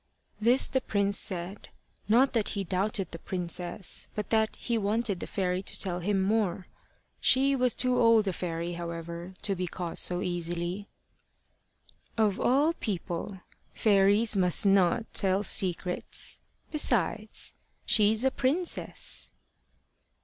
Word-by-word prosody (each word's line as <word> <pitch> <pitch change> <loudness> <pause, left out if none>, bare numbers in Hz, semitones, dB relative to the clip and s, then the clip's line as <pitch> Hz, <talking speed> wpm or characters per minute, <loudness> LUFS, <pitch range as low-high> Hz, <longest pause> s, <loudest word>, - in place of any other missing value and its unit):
This 240 +5 +4
the 260 - 0
prince 200 -3 0
said, 185 +2 -5 0.4
not 250 +5 +4
that 225 -4 +1
he 200 - -1
doubted 195 +1 -2
the 165 - -8
princess, 175 +1 -5
but 210 -2 -5
that 220 -1 +2
he 235 - -3
wanted 215 -2 0
the - - -6
fairy 185 -2 -1
to - - -5
tell 180 -3 -1
him 195 +2 0
more. 195 -3 0 0.5
She 275 +2 +3
was 250 -2 +2
too 250 -1 +2
old 230 -3 +4
a 190 - 0
fairy, 170 0 -4
however, 170 +1 -7
to 200 - +1
be 180 0 -3
caught 175 -1 -4
so 180 0 0
easily. 175 +2 -3 1.3
"Of 215 -3 +1
all 285 +6 +3
people, 190 - -5 0.3
fairies 205 +1 +3
must 180 0 +3
not 195 +1 +3
tell 195 0 +2
secrets. 180 -2 0 0.3
Besides, 225 -7 +1 0.3
she's 215 +1 +4
a 265 - +3
princess." 310 +9 -1
200 Hz, 130 wpm, -28 LUFS, 180-225 Hz, 1.3 s, This